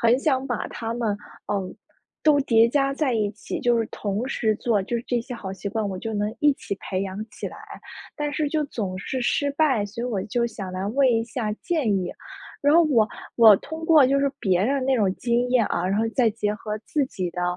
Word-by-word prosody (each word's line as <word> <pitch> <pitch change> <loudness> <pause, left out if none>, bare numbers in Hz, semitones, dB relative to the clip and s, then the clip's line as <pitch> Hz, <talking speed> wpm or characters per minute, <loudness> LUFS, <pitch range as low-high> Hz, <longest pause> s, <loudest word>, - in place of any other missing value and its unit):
很 235 +2 +4
想 270 -2 +1
把 245 -3 -2
它 225 -1 -5
们， 230 -3 -1 0.4
嗯， 195 -2 -2 0.5
都 300 -2 +5
叠 230 -4 +4
加 275 +2 +1
在 275 -2 0
一 210 -2 +1
起。 215 - -6
就 240 -1 +3
是 225 - 0
同 205 +4 -2
时 225 -5 0
做 215 -4 +1
就 235 +5 -2
是 235 - -5
这 245 -1 0
些 235 - -8
好 195 -5 -6
习 195 +1 -5
惯， 210 0 -2
我 190 - -4
就 225 +4 -5
能 210 0 -1
一 295 -1 +5
起 200 - -5
培 190 0 -2
养 195 +2 -4
起 - - -6
来， - - -8 0.6
但 295 0 -2
是 295 0 0
就 305 0 0
总 200 -9 -4
是 260 +7 -3
失 285 +4 +1
败， 280 -8 +2
所 225 +4 -7
以 - - -1
我 230 -6 -1
就 235 +3 0
想 200 -5 -5
来 185 +1 -3
问 270 +5 +3
一 225 -2 +2
下 230 -2 -3
建 305 +3 -1
议。 180 -2 -2 0.5
然 290 +2 +4
后 340 - +7
我 240 -8 +3 0.3
我 225 -3 +9
通 320 +2 -7
过 315 -5 +6
就 275 +2 +2
是 280 0 +1
别 185 -3 +2
人 275 +3 +1
那 265 -1 +3
种 200 -5 +1
经 240 +1 0
验 245 -4 +3
啊， - - -1
然 195 +2 +1
后 225 +1 +1
再 240 -4 +4
结 210 -1 -2
合 215 0 -5
自 280 +7 -1
己 185 -8 -4
的， 180 +1 -4
230 Hz, 255 characters per minute, -24 LUFS, 205-270 Hz, 0.6 s, 我